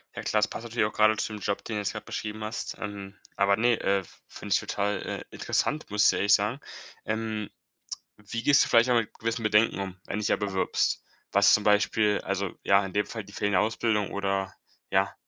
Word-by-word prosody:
Ja - - -5
klasse, 105 0 +1
passt 115 - -7
natürlich 115 -2 0
auch 105 - -2
gerade 110 0 +4
zu 110 - -3
dem 105 - -6
Job, 100 - -2
den 110 - -5
du - - -1
jetzt 100 - -2
gerade - - -6
beschrieben 110 0 -5
hast. 110 +3 -4
Ähm, 100 -1 -7 0.2
aber 100 0 +4
ne, 120 +1 +2
äh, 100 -1 +1 0.2
finde - - -9
ich - - +4
total, 100 0 -2
äh, - - -5
interessant, 155 +1 -1
muss 105 0 +4
ich - - -2
ehrlich 100 +1 +3
sagen. 105 +6 +2 0.5
Ähm, 110 -1 -3 0.7
wie 105 +3 -6
gehst 145 +2 +5
du - - -5
vielleicht 115 +1 +5
auch 125 - +3
mit 115 -3 +1
gewissen 115 +1 -2
Bedenken 110 +1 +3
um, 95 -1 -5
wenn - - -5
du - - -2
dich 105 - -1
ja - - +3
bewirbst? 100 -2 -1 0.3
Was 100 0 +6
zum 105 - +4
Beispiel 105 0 +3
also, 100 -1 -2
ja, 100 0 +4
in 95 - -9
dem 105 0 +2
Fall 110 -2 -6
die 100 - -15
fehlende 100 -2 +1
Ausbildung 110 -2 0
oder, 95 -1 -2 0.4
ja, - - +1
105 Hz, 220 wpm, -27 LUFS, 100-110 Hz, 0.7 s, Was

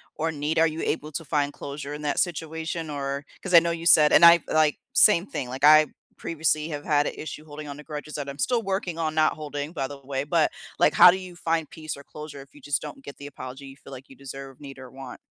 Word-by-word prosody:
or 160 +1 -2
need? 150 +1 -3
Are 165 - +5
you 160 +1 -5
able 155 0 -3
to 165 +2 -5
find 145 -1 0
closure 145 0 -7
in 150 - -7
that 145 - -1
situation? 160 -1 -3
Or 140 -1 -4 0.2
'cause 190 - -4
I 170 - +10
know 170 0 -2
you 170 0 -5
said 150 -3 +6
and - - +6
I 170 0 +9
like, 155 -1 +2 0.2
same 190 -4 +6
thing. 130 -10 -5
Like, 130 +2 -7
I 155 0 +7 0.3
previously 155 -1 -1
have 145 -2 -6
had 145 -1 +2
a - - -6
issue 155 0 -8
holding 150 0 -9
on 140 - -7
the 150 - -11
grudges 150 0 -8
that 145 -2 -5
I'm 140 - -8
still 240 - +1
working 190 -4 -3
on 155 -1 -2
not 155 0 +3
holding, 145 -1 -6
by 135 -4 -3
the 140 -1 -9
way. 135 0 -3
But, 155 +1 +1 0.3
like, 150 - +4
how 180 - +9
do 190 - -2
you 185 -2 -10
find 165 -2 -2
peace 155 -1 -7
or 140 - -12
closure 150 -2 -10
if 135 - -15
you 145 - -17
just 145 0 -1
don't 145 -2 -9
get 140 - -10
the 140 - -9
apology 135 -1 -9
you 135 - -12
feel 140 - -15
like 130 +1 -11
you 135 - -14
deserve, 135 -1 -10
need, 135 -2 -10
or 130 -1 -11
want? 135 -1 -10
150 Hz, 265 wpm, -25 LUFS, 140-160 Hz, 0.3 s, I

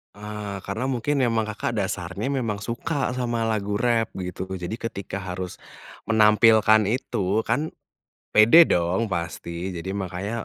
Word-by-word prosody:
Ah, 105 -1 -6
karena 110 +6 -3
mungkin 135 +3 0
memang 115 -3 +2
Kakak 110 +2 -3
dasarnya 100 +4 -2
memang 120 -6 -1
suka 130 +5 -2
sama 120 -2 -1
lagu 105 -2 -1
rap, 115 0 +2
begitu. 90 0 -5
Jadi 90 +3 -4
ketika 100 -3 -5
harus 90 -1 -6 0.5
menampilkan 110 0 +5
itu, 110 -3 -1
kan 155 +7 0 0.7
pede 120 +11 +8
dong 90 +6 +1
pasti. 85 0 -4
Jadi, 95 +3 -5
makanya, 100 +4 -4
105 Hz, 130 wpm, -24 LUFS, 95-115 Hz, 0.7 s, pede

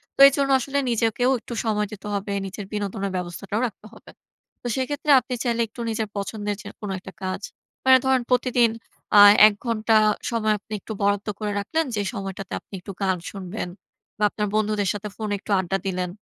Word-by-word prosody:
তো - - -25
এজন্য 275 0 0
আসলে 280 +3 -1
নিজেকেও 235 +2 +2
একটু 240 - -8
সময় 210 -2 0
দিতে 210 0 -8
হবে। 200 0 -3 0.2
নিজের 200 +1 -7
বিনোদনের 200 -1 -2
ব্যবস্থাটাও 180 +4 -4
রাখতে 215 -1 -13
হবে। - - -15 0.5
তো - - -5
সেক্ষেত্রে 290 +3 -1
আপনি 255 - -6
চাইলে 235 -2 0
একটু 225 +2 -9
নিজের 220 -1 -2
পছন্দের 205 +1 -3
যে - - -9
কোনো 205 -2 -4
একটা 190 0 -11
কাজ। 185 +1 -3 0.4
মানে 260 0 +8
ধরেন 265 -1 +3
প্রতিদিন 245 -1 +3 0.4
অ্যা 205 - +9 0.3
১ 215 - +1
ঘন্টা 225 -1 +2 0.3
সময় 220 -2 +1
আপনি 215 - -11
একটু 220 - -6
বরাদ্দ 200 +1 +1
করে 210 -1 -2
রাখলেন 320 +10 -1
যে 205 - 0
সময়টাতে 195 -2 -6
আপনি - - -27
একটু 195 - -8
গান 190 -2 +1
শুনবেন 195 0 -5 0.5
বা 210 - -2
আপনার 210 0 -2
বন্ধুদের 210 -2 +1
সাথে 205 0 -5
ফোনে 215 -2 -3
একটু 210 - -8
আড্ডা 190 +1 -1
দিলেন 180 -1 -2
210 Hz, 185 wpm, -24 LUFS, 200-235 Hz, 0.5 s, অ্যা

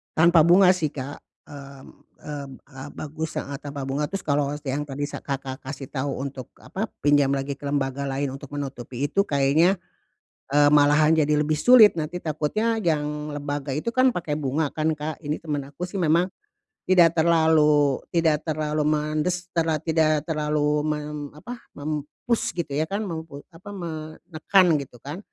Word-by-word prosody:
Tanpa 170 +1 +5
bunga 180 +2 +7
sih, 180 -4 0
Kak. 140 +1 -6 0.3
Mmm 140 -1 -12
mmm, 145 -2 -7 0.2
eee, 135 0 -10
bagus 155 +1 -5
heeh, 140 0 -4
tanpa 145 -1 -6
bunga. 145 +2 -1
Terus 195 +1 -4
kalau 145 -1 +1 0.2
yang 140 +2 -1
tadi 145 +1 -3
sa 145 - -6
Kakak 135 -1 -5
kasih 135 0 -7
tahu 140 0 -3
untuk 135 -1 -6
apa, 215 +4 -4 0.2
pinjam 145 -1 +4
lagi 140 +1 -2
ke 140 - -18
lembaga 140 -1 -1
lain 135 0 -2
untuk 135 0 -9
menutupi 135 -2 -4
itu, 155 +7 +1
kayaknya, 150 +7 +3 0.8
eee, 145 0 +5
malahan 150 +2 +5
jadi 150 -1 +2
lebih 150 +1 +1
sulit, 220 +3 +7
nanti 165 +3 -3
takutnya 170 +9 -1
yang 150 -2 -1
lembaga 145 -1 -4
itu 150 +11 -3
kan 255 +2 +3
pakai 165 -6 -3
bunga 150 +1 -1
kan, 155 +2 -1
Kak, 155 +1 -5
ini 150 +1 -2
temen 150 -4 -3
aku 145 +6 -7
sih 190 - -7
memang 170 +2 +3 0.6
tidak 170 -3 +6
terlalu 155 -4 +3
tidak 160 -3 +2
terlalu 155 -1 -1
mendes 155 +4 0
karena 160 -2 +1
tidak 155 -1 +1
terlalu 150 -1 0
mem 150 -1 -4
apa, 240 +11 -8 0.2
mem-push 150 +10 -3
gitu 170 -4 -4
ya 150 - +1
kan, 200 +5 -3
mem 165 -3 -4
pe 140 -2 -10
apa, 180 +5 -12
menekan 165 +2 0
gitu 130 -3 -10
kan, 145 +5 -6
150 Hz, 165 wpm, -24 LUFS, 145-165 Hz, 0.8 s, bunga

